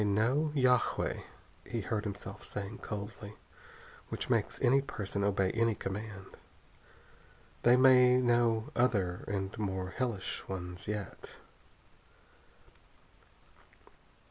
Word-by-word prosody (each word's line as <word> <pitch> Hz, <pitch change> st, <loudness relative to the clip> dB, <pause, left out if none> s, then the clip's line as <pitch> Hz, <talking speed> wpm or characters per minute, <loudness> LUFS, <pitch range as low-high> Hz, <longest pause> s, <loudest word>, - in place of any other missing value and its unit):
"They -, -, +2 dB
know 120 Hz, +10 st, +2 dB
yagué," 125 Hz, -3 st, +2 dB, 0.4 s
he 115 Hz, +3 st, -4 dB
heard 105 Hz, +2 st, -2 dB
himself 100 Hz, 0 st, -6 dB
saying 100 Hz, +2 st, -6 dB
coldly, 105 Hz, 0 st, -6 dB, 0.7 s
"which -, -, -4 dB
makes -, -, +1 dB
any 135 Hz, +2 st, +4 dB
person 105 Hz, -7 st, -4 dB
obey 100 Hz, -2 st, +2 dB
any 115 Hz, -1 st, +1 dB
command. 100 Hz, 0 st, -5 dB, 1.4 s
They 120 Hz, +1 st, +6 dB
may 125 Hz, -1 st, +7 dB
know 120 Hz, -2 st, +2 dB
other 100 Hz, -8 st, +1 dB
and 95 Hz, -1 st, -3 dB
more 95 Hz, -3 st, -2 dB
hellish 115 Hz, -6 st, -3 dB
ones 90 Hz, -1 st, -6 dB
yet." 105 Hz, -2 st, -5 dB
105 Hz, 100 wpm, -32 LUFS, 100-120 Hz, 1.4 s, may